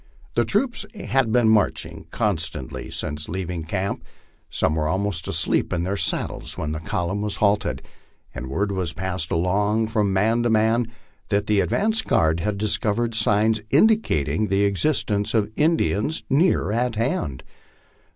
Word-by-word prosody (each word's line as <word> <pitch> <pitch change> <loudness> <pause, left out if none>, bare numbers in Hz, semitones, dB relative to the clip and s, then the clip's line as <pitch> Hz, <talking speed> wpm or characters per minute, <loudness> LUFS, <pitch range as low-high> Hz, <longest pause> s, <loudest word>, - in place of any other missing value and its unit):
The - - +2
troops 255 -3 0
had 135 - 0
been 120 -1 +4
marching 110 -1 +1
constantly 85 -7 -2
since 75 +1 -3
leaving 90 -2 -4
camp; 95 +4 -3 0.5
some - - 0
were 75 -1 0
almost 95 0 -1
asleep 85 -4 +1
in 85 -1 -1
their 95 +3 -1
saddles - - -1
when 75 - -3
the 80 - -3
column 90 +4 -2
was 105 -1 -2
halted, 105 +1 +1 0.5
and 65 0 -6
word 100 +9 -1
was 90 -4 -2
passed 95 -2 -3
along 105 +6 +1
from 105 -3 +1
man 110 +5 +2
to 120 - +1
man 110 +1 +2 0.4
that 100 0 +1
the 105 -1 +2
advance 220 - +1
guard 80 - +2
had 105 +3 -1
discovered 110 +2 0
signs 110 0 +2
indicat 210 - +3
ing 110 0 0
the 100 0 +2
existence 105 0 0
of 105 -1 +1
Indians 155 -4 +1
near 145 - +3
at 120 +1 0
hand. 105 - -2
105 Hz, 150 wpm, -23 LUFS, 90-115 Hz, 0.5 s, been